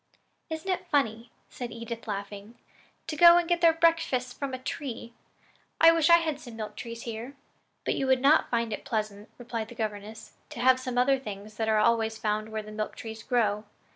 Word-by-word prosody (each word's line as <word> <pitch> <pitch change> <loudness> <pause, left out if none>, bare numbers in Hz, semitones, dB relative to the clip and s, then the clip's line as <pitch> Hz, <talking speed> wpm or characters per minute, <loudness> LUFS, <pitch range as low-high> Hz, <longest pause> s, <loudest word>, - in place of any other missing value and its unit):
"Isn't 320 +3 -5
it 365 - -3
funny," 230 -5 0 0.2
said 245 -2 -7
Edith, 230 0 -7
laughing, 200 +2 -6 0.5
"to 320 - -4
go 340 +2 +8
and 350 -1 +1
get 345 0 +1
their 335 -1 +7
breakfasts 325 -7 +1
from 280 -1 -4
a 260 - -3
tree? 255 -2 -6 0.7
I 330 +1 +8
wish 330 -1 +2
we 340 - +9
had 320 -4 0
some 240 -5 -11
milk 215 -2 -6
trees 230 0 -7
here." 235 +4 -6 0.5
"But - - +1
you 270 - -1
would 260 -1 +4
not 285 +4 +4
find 230 -2 0
it - - -6
pleasant," 210 -1 -3
replied 230 -2 -5
their 240 - -13
governess, 215 0 -5 0.2
"to - - -9
have 255 +1 +5
some 255 -1 -4
other 265 +2 +3
things 210 -3 -9
that 220 -1 -1
are 215 - +3
always 225 0 +2
found 215 0 -2
where 220 -1 -4
the 215 - -10
milk 215 0 -4
tree 225 -1 -7
grows. 215 -4 +1
235 Hz, 200 wpm, -28 LUFS, 220-275 Hz, 0.7 s, we